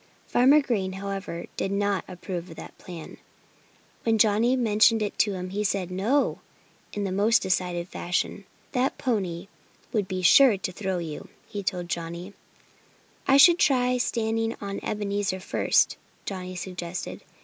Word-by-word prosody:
Farmer 270 Hz, +5 st, +5 dB
Green, 200 Hz, -9 st, -1 dB
however, 195 Hz, -3 st, -5 dB
did 195 Hz, -, -1 dB
not 200 Hz, -1 st, 0 dB
approve 180 Hz, -1 st, -6 dB
of 165 Hz, -, -10 dB
that -, -, -10 dB
plan. 170 Hz, -3 st, -9 dB, 0.8 s
When 225 Hz, -1 st, +2 dB
Johnnie 220 Hz, +4 st, +4 dB
mentioned 225 Hz, -2 st, +4 dB
it 205 Hz, -, -3 dB
to 205 Hz, -, +3 dB
him 185 Hz, -1 st, -5 dB
he 205 Hz, +2 st, -1 dB
said 195 Hz, -3 st, -1 dB
"No!" 220 Hz, +10 st, +1 dB, 0.5 s
in 205 Hz, -1 st, -3 dB
a 190 Hz, -, -2 dB
most 210 Hz, +5 st, +3 dB
decided 180 Hz, -2 st, -1 dB
fashion. 180 Hz, 0 st, -2 dB, 0.3 s
"That 260 Hz, +1 st, 0 dB
pony 195 Hz, -8 st, -2 dB, 0.5 s
would 210 Hz, -4 st, 0 dB
be 185 Hz, 0 st, -3 dB
sure 245 Hz, +3 st, +7 dB
to 185 Hz, -, -4 dB
throw 190 Hz, 0 st, -3 dB
you," 160 Hz, -3 st, -6 dB, 0.2 s
he 205 Hz, -, -5 dB
told 180 Hz, -2 st, -3 dB
Johnnie. 170 Hz, +3 st, -5 dB, 0.9 s
"I 270 Hz, -, +6 dB
could 345 Hz, +4 st, +8 dB
try 250 Hz, -2 st, +3 dB
standing 225 Hz, -1 st, 0 dB
on 200 Hz, -1 st, -4 dB
Ebenezer 200 Hz, -2 st, -2 dB
first," 185 Hz, -, +2 dB, 0.3 s
Johnnie 185 Hz, -2 st, -5 dB
suggested. 180 Hz, -1 st, -5 dB
200 Hz, 150 wpm, -26 LUFS, 185-225 Hz, 0.9 s, could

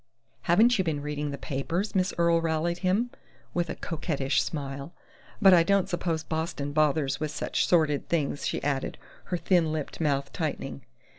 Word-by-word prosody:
"Haven't 220 Hz, +6 st, +5 dB
you -, -, +3 dB
been 150 Hz, -4 st, -2 dB
reading 150 Hz, 0 st, -3 dB
the 140 Hz, -, -4 dB
papers?" 165 Hz, +9 st, -2 dB
Miss 185 Hz, 0 st, +2 dB
Earle 170 Hz, -1 st, +3 dB
rallied 165 Hz, +1 st, 0 dB
him, 200 Hz, +7 st, +1 dB, 0.4 s
with 175 Hz, -2 st, 0 dB
a -, -, -3 dB
coquettish 150 Hz, -4 st, -1 dB
smile. 140 Hz, +1 st, -5 dB, 0.5 s
"But 195 Hz, -3 st, +7 dB
I 175 Hz, -, +7 dB
don't 195 Hz, +2 st, +2 dB
suppose 170 Hz, -3 st, -1 dB
Boston 160 Hz, -3 st, -3 dB
bothers 145 Hz, -2 st, +2 dB
with 155 Hz, -, -2 dB
such 145 Hz, -, -1 dB
sordid 155 Hz, -5 st, +2 dB
things," 145 Hz, -4 st, 0 dB
she -, -, -2 dB
added, 140 Hz, -2 st, -1 dB, 0.3 s
her 180 Hz, -, -2 dB
thin 170 Hz, -1 st, +2 dB
lipped 155 Hz, +1 st, -4 dB
mouth 140 Hz, -3 st, 0 dB
tightening. -, -, -3 dB
160 Hz, 165 wpm, -28 LUFS, 145-175 Hz, 0.5 s, But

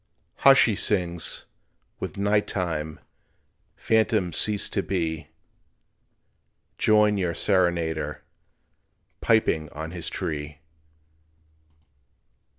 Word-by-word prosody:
"Hush!" 135 Hz, 0 st, +7 dB
he 110 Hz, -, 0 dB
sings, 85 Hz, -5 st, 0 dB, 0.5 s
"with -, -, -6 dB
night 100 Hz, +1 st, +1 dB
time 80 Hz, -4 st, -3 dB, 0.8 s
Phantoms 110 Hz, -5 st, +1 dB
cease 105 Hz, -2 st, +1 dB
to 100 Hz, -, 0 dB
be, 80 Hz, -6 st, -3 dB, 1.5 s
Join 105 Hz, -1 st, +4 dB
your 90 Hz, -3 st, -1 dB
serenader 85 Hz, -6 st, 0 dB, 1.0 s
Piping 80 Hz, -9 st, +2 dB
on 80 Hz, +2 st, -7 dB
his 85 Hz, -2 st, -5 dB
tree." 75 Hz, -1 st, -4 dB
90 Hz, 80 wpm, -25 LUFS, 80-105 Hz, 1.5 s, Hush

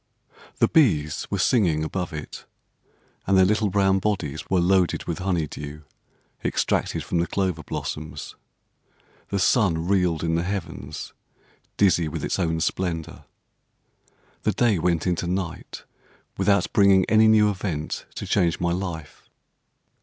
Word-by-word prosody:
The -, -, +4 dB
bees 80 Hz, -, +2 dB
were -, -, -1 dB
singing 85 Hz, -11 st, +2 dB
above 90 Hz, +3 st, -3 dB
it; 75 Hz, -2 st, -8 dB, 0.8 s
and 95 Hz, 0 st, +4 dB
their 95 Hz, -, +6 dB
little 105 Hz, +1 st, +1 dB
brown 95 Hz, 0 st, +2 dB
bodies 90 Hz, -8 st, -3 dB
were 95 Hz, -, +3 dB
loaded 90 Hz, 0 st, +2 dB
with 85 Hz, -, -4 dB
honey 90 Hz, -4 st, 0 dB
dew, 75 Hz, +1 st, -8 dB, 0.6 s
extracted -, -, 0 dB
from 85 Hz, -, -1 dB
the 85 Hz, -, 0 dB
clover 95 Hz, -5 st, -1 dB
blossoms. 75 Hz, +1 st, -6 dB, 0.9 s
The 100 Hz, -, -2 dB
sun 90 Hz, -6 st, +2 dB
reeled 90 Hz, -5 st, +1 dB
in 80 Hz, -1 st, 0 dB
the 85 Hz, -, +1 dB
heavens 85 Hz, -6 st, -5 dB, 0.6 s
dizzy 90 Hz, -5 st, +3 dB
with 75 Hz, -, -4 dB
its -, -, -2 dB
own 80 Hz, -2 st, 0 dB
splendour. 85 Hz, -2 st, -3 dB, 1.2 s
The -, -, 0 dB
day 110 Hz, -7 st, +2 dB
went 85 Hz, -1 st, 0 dB
into 90 Hz, -1 st, -1 dB
night, 90 Hz, -2 st, -4 dB, 0.5 s
without 100 Hz, -1 st, +1 dB
bringing 100 Hz, -3 st, +5 dB
any 110 Hz, 0 st, +5 dB
new 105 Hz, -1 st, +5 dB
event 90 Hz, -6 st, -4 dB
to -, -, -5 dB
change 85 Hz, -2 st, +1 dB
my 85 Hz, -1 st, 0 dB
life. 85 Hz, -4 st, -5 dB
90 Hz, 140 wpm, -24 LUFS, 80-100 Hz, 1.2 s, their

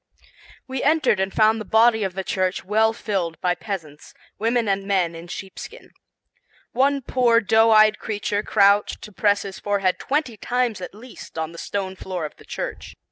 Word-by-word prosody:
We 260 Hz, -1 st, -3 dB
entered 305 Hz, -8 st, +2 dB
and 190 Hz, 0 st, 0 dB
found 220 Hz, +1 st, +3 dB
the -, -, -4 dB
body 220 Hz, +1 st, +4 dB
of 190 Hz, -2 st, -3 dB
the 190 Hz, -, -3 dB
church 185 Hz, 0 st, -1 dB
well 220 Hz, +3 st, +3 dB
filled 195 Hz, -7 st, -3 dB
by 180 Hz, -1 st, +1 dB
peasants, 165 Hz, -7 st, -7 dB, 0.2 s
women 230 Hz, +1 st, +1 dB
and 195 Hz, 0 st, -1 dB
men 185 Hz, -4 st, +1 dB
in 165 Hz, +1 st, -10 dB
sheepskin. 195 Hz, -, -9 dB, 0.8 s
One 275 Hz, +2 st, +1 dB
poor 240 Hz, -2 st, +3 dB
doe 225 Hz, +1 st, +4 dB
eyed 215 Hz, -1 st, +5 dB
creature 205 Hz, -1 st, -2 dB
crouched 200 Hz, 0 st, +2 dB
to 210 Hz, -, -9 dB
press 205 Hz, 0 st, +1 dB
his 195 Hz, -1 st, -8 dB
forehead 200 Hz, -3 st, 0 dB
twenty 275 Hz, -5 st, -1 dB
times 240 Hz, -2 st, -1 dB
at 180 Hz, -, -7 dB
least 235 Hz, -5 st, -12 dB
on 160 Hz, 0 st, -3 dB
the 170 Hz, -, -10 dB
stone 190 Hz, -2 st, -4 dB
floor 185 Hz, -3 st, -5 dB
of 150 Hz, -, -8 dB
the -, -, -17 dB
church. -, -, -6 dB
205 Hz, 180 wpm, -23 LUFS, 190-225 Hz, 0.8 s, eyed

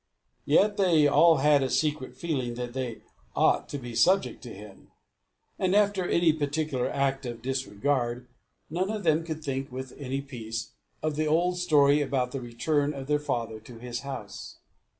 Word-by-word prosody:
Yet 205 Hz, +8 st, +3 dB
they 170 Hz, -6 st, +4 dB
all 165 Hz, +3 st, +6 dB
had 145 Hz, +1 st, +4 dB
a 135 Hz, -, 0 dB
secret 150 Hz, -3 st, -1 dB
feeling 130 Hz, -8 st, -2 dB
that 120 Hz, 0 st, -5 dB
they 125 Hz, -4 st, -4 dB, 0.3 s
ought -, -, +2 dB
to 145 Hz, -, -4 dB
be 120 Hz, -3 st, -8 dB
subject 185 Hz, +12 st, +2 dB
to 125 Hz, -, -9 dB
him; 100 Hz, -1 st, -12 dB, 0.7 s
and 185 Hz, +1 st, +2 dB
after 205 Hz, -3 st, +2 dB
any 170 Hz, -2 st, +4 dB
particular 145 Hz, -3 st, -1 dB
act 135 Hz, 0 st, 0 dB
of 120 Hz, -1 st, -7 dB
disregard, 125 Hz, -1 st, -1 dB, 0.4 s
none 180 Hz, +5 st, -1 dB
of 215 Hz, -1 st, -3 dB
them 160 Hz, 0 st, +3 dB
could 160 Hz, -1 st, -6 dB
think, 135 Hz, -2 st, -3 dB
with 130 Hz, 0 st, -6 dB
any 135 Hz, -1 st, -3 dB
peace, 115 Hz, -5 st, -6 dB, 0.3 s
of 155 Hz, -1 st, -1 dB
the 155 Hz, 0 st, +1 dB
old 175 Hz, +3 st, +2 dB
story 145 Hz, -4 st, +4 dB
about 130 Hz, -3 st, -1 dB
the 135 Hz, -, -4 dB
return 145 Hz, +5 st, -1 dB
of 135 Hz, -1 st, -6 dB
their 150 Hz, +1 st, +1 dB
father 115 Hz, -6 st, -3 dB
to 115 Hz, +2 st, -13 dB
his 120 Hz, 0 st, -5 dB
house. 105 Hz, -8 st, -8 dB
140 Hz, 170 wpm, -27 LUFS, 125-155 Hz, 0.7 s, all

